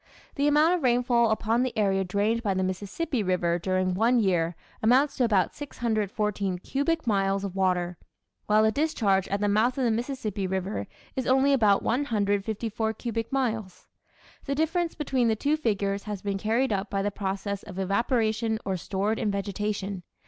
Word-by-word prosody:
The 285 0 +1
amount 300 +4 +4
of 360 - 0
rainfall 240 -2 +3
upon 220 +2 +1
the 255 -3 -2
area 195 -2 +2
drained 205 +5 0
by 200 -4 0
the 190 - 0
Mississippi 205 - -2
River 175 -3 +1
during 185 +1 0
one 230 +6 +3
year 175 -5 +1 0.3
amounts 260 +6 +3
to 255 - +2
about 205 -6 +2
614 210 -7 -2
cubic 285 - -1
miles 195 -2 +1
of 195 -2 -5
water, 180 -2 0 0.5
while 215 +1 +4
the 220 - +4
discharge 220 - +1
at 200 +1 -2
the 205 - +2
mouth 220 +5 +2
of 265 - 0
the 235 - +2
Mississippi 220 -5 -2
River 190 +2 -3 0.3
is 260 -3 -2
only 270 +2 +4
about 210 -7 +3
154 220 -2 -1
cubic 230 0 -4
miles. 225 -8 -2 0.6
The 275 - -1
difference 325 +3 0
between 265 -5 0
the 220 - +2
two 290 +7 +1
figures 200 -8 -1
has 210 -3 -5
been 200 -1 -2
carried 225 +4 +1
up 195 0 -2
by 195 -1 -1
the 205 - 0
process 200 0 -3
of 190 -2 -10
evaporation 220 +3 0
or 190 -1 -1
stored 200 +5 -1
in 215 - 0
vegetation. 200 -1 -3
215 Hz, 170 wpm, -27 LUFS, 195-245 Hz, 0.6 s, amount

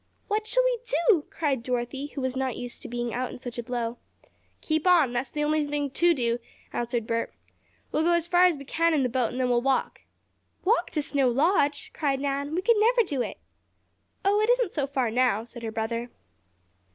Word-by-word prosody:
"What 430 +1 -1
shall - - +3
we - - +1 0.3
do?" 340 -9 +4
cried 285 -6 -1
Dorothy, 250 +3 -3
who 280 - -3
was 260 0 -1
not 260 -1 -2
used 245 -1 -7
to - - -7
being 240 0 -3
out 250 +1 -2
in - - -8
such 245 -1 -6
a - - 0
blow. 240 -1 -3 0.6
"Keep 315 +2 0
on 325 -9 +5
that's 245 +2 -2
the 295 -1 -2
only 305 0 +2
thing 290 -1 -2
to 345 +4 +3
do," 235 -2 0 0.3
answered 240 -1 -2
Bert. 230 0 -1 0.6
"We - - 0
will 320 - +2
go 345 - +4
as 340 -1 +2
far 355 +1 +5
as 350 -4 +3
we 280 - -10
can 330 +3 +2
in 280 - +2
the 250 - +1
boat 245 -1 0
and 250 - -5
then 255 -1 +1
we'll 240 -1 +3
walk." 270 +1 0 0.6
"Walk 450 +6 +2
to 300 - 0
Snow 280 -4 +2
Lodge!" 285 +2 +1
cried 275 -3 0
Nan. 280 +2 -2
"We 365 - -1
could 465 +1 +4
never 470 +2 +4
do 285 - -2
it!" - - -4 0.9
"Oh, 410 +2 +3
it 430 - +1
isn't - - +2
so 285 -3 -1
far 260 -5 -1
now," 240 -3 +2
said 235 0 -10
her 225 -1 -4
brother. 230 +2 -3
275 Hz, 220 wpm, -26 LUFS, 245-335 Hz, 0.9 s, on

